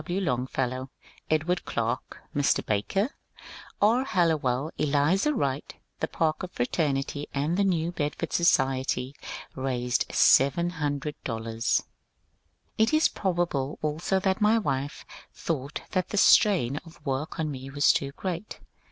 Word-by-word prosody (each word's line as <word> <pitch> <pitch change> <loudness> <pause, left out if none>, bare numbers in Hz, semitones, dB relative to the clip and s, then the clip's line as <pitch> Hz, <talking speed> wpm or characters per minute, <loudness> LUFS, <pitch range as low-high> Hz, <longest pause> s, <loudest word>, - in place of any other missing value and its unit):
W. 175 +4 -2
Longfellow, 130 -4 -2 0.4
Edward 160 +3 +1
Clarke, - - -3
Mr. 145 -1 +2
Barker, 195 - 0 0.7
R. 230 +5 +4
Hallowell, 155 - +1
Elizur 150 - +2
Wright, 140 - -2 0.2
the - - -1
(Parker) 165 +3 -1
Fra 120 -8 -2
temity, 145 -1 -1
the 160 +8 +1
New 170 -3 +1
Bedford 150 -4 -3
Society 135 -5 +2 0.4
raised 125 -2 -1
$700." 140 -7 +1 1.0
It 220 +6 +3
is 310 - +4
probable 170 -7 -1
also 155 +5 0
that 190 +2 0
my 215 +2 +5
wife 140 -8 -2 0.3
thought 145 -3 -3
that 185 -2 0
the 205 - -3
strain 175 - +5
of 165 +1 -12
work 140 +6 -3
on 155 -2 -1
me 135 0 -7
was 145 +1 +4
too 140 0 -1
great. 185 +4 -5
150 Hz, 120 wpm, -27 LUFS, 135-180 Hz, 1.0 s, my